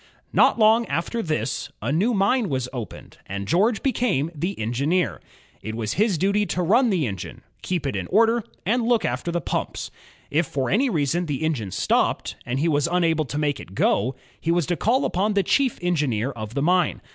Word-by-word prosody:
Not - - +5
long 225 +1 +4
after 230 +8 -2
this, 155 - -2
a - - -2
new 190 +11 +2
mine 205 +2 +2
was 130 -2 -1
opened, 120 -4 -8
and 100 0 -5
George 215 - +2
became 210 - 0
the 175 +6 -3
engineer. 125 - 0 0.4
It 110 +2 -5
was 110 -2 -2
his 205 -3 +2
duty 200 +4 +1
to 180 - -1
nm 230 +8 +4
the 180 -8 +1
engine, 95 -6 -6 0.2
keep 175 -5 -2
it 135 - -1
in - - -3
order, 225 +3 +3 0.2
and 240 +6 +2
look 235 0 +2
after 125 +8 -2
the 175 - 0
pumps. - - -3 0.4
If 155 +2 +2
for 135 -2 -2
any 255 +7 +3
reason 165 - 0
the 145 0 -2
engine 135 -11 -1
stopped, 95 - 0
and 125 +2 -1
he 160 - +1
was 145 -1 +2
imable 165 -3 +1
to 145 - -4
make 145 -2 0
it 95 - -11
go, 120 +7 +1 0.2
he 165 - -4
was 170 -1 +2
to 175 - 0
call 245 +9 +1
upon 200 +3 0
the 200 - +3
chief 265 +6 +2
engineer 140 -9 0
of 110 -2 -7
the 140 - 0
mine. 180 0 +2
170 Hz, 200 wpm, -23 LUFS, 135-205 Hz, 0.4 s, Not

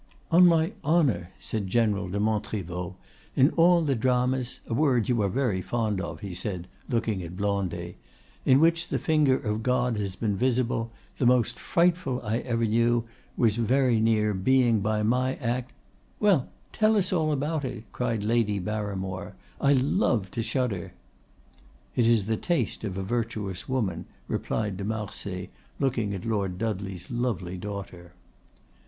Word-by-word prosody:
"On 180 +2 +8
my 165 +1 +3
honor!" 135 - +2
said 105 -3 -4
General 100 -2 +1
de 100 +3 -2
Montriveau, 100 -4 -2 0.4
"in 135 +4 +5
all 170 0 +5
the 145 -3 +1
dramas—a 125 0 0
word 125 -4 +2
you 120 -3 +2
are 100 - +1
very 110 -4 0
fond 110 -2 -1
of," - - -6
he 100 -3 -5
said, 90 -1 -4 0.2
looking 115 -5 0
at 85 +1 -7
Blondet—"in 100 +5 -1
which 165 +2 +3
the - - -1
finger 150 -5 +3
of 105 -1 -2
God 125 -1 +1
has 100 -3 -3
been 105 -3 -1
visible, 120 0 0 0.3
the 125 - +3
most 125 -3 +2
frightful 170 -7 +1
I 110 +2 0
ever 115 -2 0
knew 115 +1 +2 0.3
was 115 -2 +3
very 125 0 +3
near 110 -1 +2
being 120 +3 +3
by 105 +1 0
my 125 +4 +1
act——" 125 0 -2 0.5
"Well, 195 -11 +3 0.2
tell 215 -1 +3
us 190 -2 +1
all 160 -3 +2
about 150 +2 -1
it!" 120 -4 -5
cried 115 -4 -1
Lady 110 -2 +1
Barimore; 95 -1 -4 0.3
"I 140 0 +5
love 130 - +1
to 115 - -2
shudder!" 115 -5 -2 1.0
"It 120 -2 +3
is 115 -4 +3
the 110 +1 0
taste 175 -3 -1
of 95 -3 -3
a 95 - -2
virtuous 105 -3 -3
woman," 105 -10 -1 0.2
replied 105 -4 -2
de 100 - -4
Marsay, 100 -3 -4 0.3
looking 120 -7 0
at 95 - -7
Lord 100 -5 -1
Dudley's 100 -3 -4
lovely 110 -7 -2
daughter. 90 -2 -7
115 Hz, 150 wpm, -27 LUFS, 100-130 Hz, 1.0 s, On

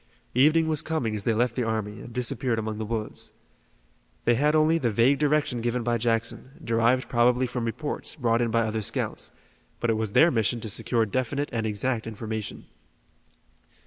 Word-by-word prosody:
Evening 155 +6 +4
was 155 -2 +1
coming 155 -10 -2
as 105 - -4
they 115 - +3
left 120 +1 +1
the 125 - -1
army, 110 -2 -3
and 120 - -10
disappeared 125 0 0
among 110 -1 -3
the 110 - -3
woods. 110 -1 -4 0.9
They 120 - +5
had 150 +6 +2
only 155 +2 +4
the 125 -6 +1
vague 120 +6 +3
direction 145 -5 +1
given 120 +1 -1
by 120 0 0
Jackson, 115 +3 -2
derived 115 +2 +2
probably 125 +1 +3
from 125 -1 -3
reports, 125 +6 -3
brought 120 -5 +1
in 120 - +1
by 115 +1 +2
other 110 -1 -1
scouts, 100 - -3 0.5
but 120 - +1
it 110 - 0
was 110 -2 -2
their 170 +2 +6
mission 115 -1 +1
to 110 - -5
secure 115 +2 +1
definite 130 +6 -2
and 110 -2 -1
exact 110 +2 -1
information. 110 -1 -5
120 Hz, 180 wpm, -26 LUFS, 110-130 Hz, 0.9 s, their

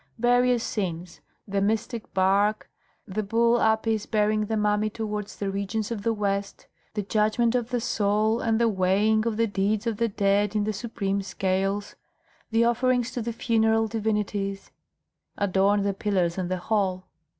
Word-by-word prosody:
Various 245 0 +3
scenes 175 -4 -4 0.3
the 200 0 -1
mystic 220 +2 -2
bark, 200 +3 +1 0.4
the 210 +2 -2
bull 230 +3 +2
Apis 220 -1 +1
bearing 215 0 +1
the 220 - -1
mummy 210 0 +1
towards 210 -1 -5
the 200 -1 -3
regions 200 +3 -3
of 220 -3 -3
the 230 - +1
West, 200 -2 -2 0.3
the 210 - -1
judgment 215 +3 +1
of 245 -2 -1
the 245 -1 0
soul 215 0 +1
and 225 -1 +1
the 235 - +3
weighing 210 +3 +2
of 220 -2 -1
the 230 - +3
deeds 205 +1 -1
of 230 -3 -1
the 230 - +1
dead 200 +1 +1
in 210 - +2
the 215 +1 -1
supreme 200 -2 -2
scales, 195 +1 -2 0.5
the 225 +1 +3
offerings 245 +1 +1
to 250 - -3
the 235 +1 -3
funeral 225 -1 +2
divinities 210 -2 -2 0.7
adorned 200 +1 +2
the 200 - +1
pillars 190 -4 0
and 185 -2 -3
the 185 - -1
hall. 185 -1 -1
210 Hz, 160 wpm, -26 LUFS, 200-225 Hz, 0.7 s, Various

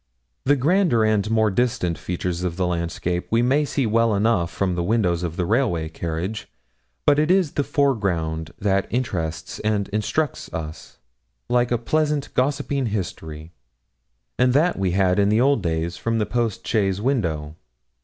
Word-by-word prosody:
The 145 +2 +4
grander 155 - +3
and 110 -1 +1
more 110 -1 +2
distant 95 -6 0
features 90 0 -3
of 90 -1 -2
the 95 - +1
landscape 85 0 -2
we 115 +1 +2
may 140 +4 +2
see 140 -1 -1
well 115 0 +2
enough 100 -5 +2
from 95 -2 -1
the 85 - -1
window 105 0 +2
of 85 -1 -3
the 90 - 0
railway 100 -8 +1
carriage; 85 +6 -4 0.6
but 145 0 +5
it 155 +2 +2
is 185 -5 +3
the 145 - 0
foreground 90 - 0
that 100 -1 +1
interests 90 -10 -3
and 105 -2 -1
instructs 110 +9 -2
us, 80 -1 -7 0.5
like 120 0 +2
a 120 - +3
pleasant 150 +4 -1
gossiping 140 0 0
history; 80 -6 -5 0.9
and 125 0 +4
that 160 +6 +3
we 95 -1 0
had, 95 0 +2
in 105 +2 +3
old 135 -1 +3
days, 85 0 -2
from 115 0 -1
the 105 - +1
post 115 +1 -2
chaise 100 -4 +1
window. 85 - -1
105 Hz, 160 wpm, -23 LUFS, 90-125 Hz, 0.9 s, but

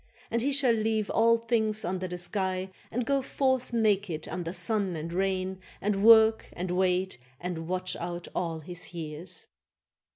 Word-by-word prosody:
And 235 0 +1
he 280 +4 +1
shall 270 -4 +4
leave 220 -1 0
all 230 +1 +5
things 220 -2 0
under 185 +1 -2
the 180 0 -5
sky 185 +1 -1 0.2
And 245 +1 -2
go 275 +1 +2
forth 260 -1 0
naked 200 -8 +1
under 175 -2 -4
sun 190 0 -1
and 165 +2 -5
rain 190 0 -1 0.2
And 200 -1 0
work 220 0 +7
and 180 +1 -3
wait 185 -3 +1 0.2
and 170 -2 -4
watch 185 +1 -2
out 175 0 -5
all 165 -2 -2
his 175 +2 -7
years. 165 +2 -3
190 Hz, 160 wpm, -29 LUFS, 175-220 Hz, 0.2 s, work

